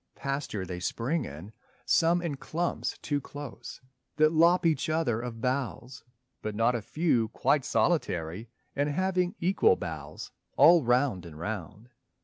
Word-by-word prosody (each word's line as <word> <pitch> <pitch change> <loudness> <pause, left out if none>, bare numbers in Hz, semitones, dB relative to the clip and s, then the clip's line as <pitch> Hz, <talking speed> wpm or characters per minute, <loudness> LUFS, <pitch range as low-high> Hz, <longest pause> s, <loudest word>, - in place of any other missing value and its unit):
Pasture 135 -8 -3
they 90 -1 -6
spring 130 - -1
in, 80 +10 -9 0.3
some 170 +1 +3
in 160 -4 -2
clumps 170 +5 -3
too 145 -1 -1
close 140 -4 -9 0.3
That 155 +1 +4
lop 170 +2 +4
each 155 -2 +1
other 155 -8 0
of 120 -2 -6
boughs, 130 0 -3 0.4
but 110 -1 -4
not 115 +3 +2
a 120 - -2
few 125 -3 +1
Quite 140 +5 +1
solitary 100 - 0 0.3
and 145 +1 +1
having 180 +4 0
equal 195 - +3
boughs - - -7 0.3
All 170 -3 +7
round 125 -5 +2
and 80 -3 -11
round. 105 +5 -6
135 Hz, 140 wpm, -28 LUFS, 110-165 Hz, 0.4 s, All